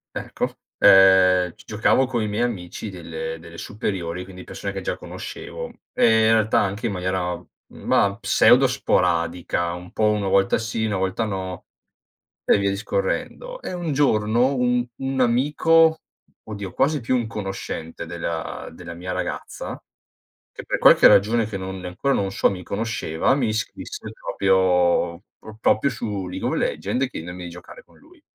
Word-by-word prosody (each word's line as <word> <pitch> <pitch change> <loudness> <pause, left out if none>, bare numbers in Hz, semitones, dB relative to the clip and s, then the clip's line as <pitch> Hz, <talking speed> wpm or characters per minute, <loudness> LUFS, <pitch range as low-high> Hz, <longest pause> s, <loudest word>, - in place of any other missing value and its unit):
Ecco, - - -3 0.2
ehm, 95 -2 +6
g - - -17
giocavo 110 +5 +2
coi 120 -4 -1
miei 105 +3 -1
amici 100 -3 -4
delle 80 -2 -6
delle 85 0 -12
superiori, 90 -4 -4
quindi 90 -1 -11
persone 100 - -6
che 95 0 -5
già - - -2
conoscevo - - -7 0.2
e, 110 -1 +4
in 115 - +5
realtà, 110 0 +3
anche 100 +4 -2
in 110 - 0
maniera, 90 -1 -2 0.3
mah, 100 0 +1
pseudo - - +5
sporadica, 85 0 0
un 90 +1 -9
po' 110 - -2
uno 105 -2 0
volta 95 +2 +3
sì, 110 0 -2
una 105 -3 -1
volta 95 +4 -1
no, 95 -3 -5 0.8
e - - +4
via 100 0 +1
discorrendo. - - -3
E - - -5
un 175 -4 -3
giorno, 120 -2 +2
un 125 -1 +1
un 135 0 -2
amico, 155 +6 +3 0.4
oddio 100 -3 -6
quasi 150 +7 +1
più 120 +3 0
un 120 -2 0
conoscente, 95 -6 -6
della 85 -1 -5
della 85 +1 -9
mia 90 +2 -6
ragazza, 90 - -5 0.7
che - - -9
per - - -1
qualche - - +7
ragione 110 +3 +4
che 105 - -5
non 95 0 -6
e - - -5
ancora 115 +10 -1
non 100 -1 0
so 100 - +2
mi 90 -2 -6
conosceva, 105 -1 -1
mi 130 -5 +1
iscrisse 110 +1 -4
proprio 90 -2 +2 0.2
pro 110 0 -12
proprio 115 +5 +2
su 105 -6 -4
League 90 +1 -4
of - - -1
Legend, 130 +1 -1
chiedendomi 90 -3 -7
di - - -6
giocare 90 - -12
con - - -24
lui. 335 0 -21
100 Hz, 160 wpm, -23 LUFS, 90-115 Hz, 0.8 s, qualche